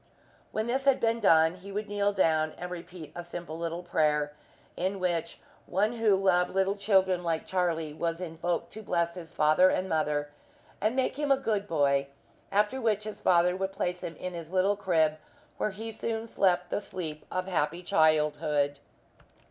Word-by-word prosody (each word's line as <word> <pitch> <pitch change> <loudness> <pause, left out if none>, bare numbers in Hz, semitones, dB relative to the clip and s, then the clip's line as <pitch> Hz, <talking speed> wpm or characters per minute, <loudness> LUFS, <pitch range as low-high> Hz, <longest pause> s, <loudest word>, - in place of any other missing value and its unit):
When 215 - -1
this 265 +3 -1
had 275 -2 +4
been 230 0 +1
done 160 -5 +5
he 185 +2 -11
would 210 +2 -3
kneel 205 0 +1
down 160 -5 +2
and 180 +1 -6
repeat 175 -2 -8
a 175 - -6
simple 170 -2 -7
little 170 +1 -3
prayer, 150 -3 +1 0.4
in 190 +2 -2
which 170 -2 -1 0.3
One 210 +5 +1
who 225 -4 +3
loved 185 -2 +2
little 195 0 +2
children 190 -3 +2
like 165 -2 -1
Charlie 165 -4 -1
was 165 +2 -2
invoked 170 0 -3
to 220 - -7
bless 170 -3 -2
father 155 +5 +4
and 185 - 0
mother 150 -3 0 0.5
and 215 +4 +1
make 265 +2 0
him 290 -2 +1
a 275 - +6
good 210 -6 -1
boy; 140 -4 +2 0.4
after 210 +6 +1
which 215 -3 +1
his 215 0 -6
father 180 0 +3
would 190 0 -3
place 180 -1 -2
him 165 - -5
in 180 +4 -6
his 165 -2 -7
little 190 +2 +2
crib, 160 -6 +1 0.4
where - - 0
he 220 +3 -6
soon 225 +1 -3
slept 180 -5 +1
the - - 0
sleep 165 -7 -6
of 185 0 -1
happy 170 -1 -1
childhood. 150 -3 +2
180 Hz, 175 wpm, -29 LUFS, 160-200 Hz, 0.5 s, a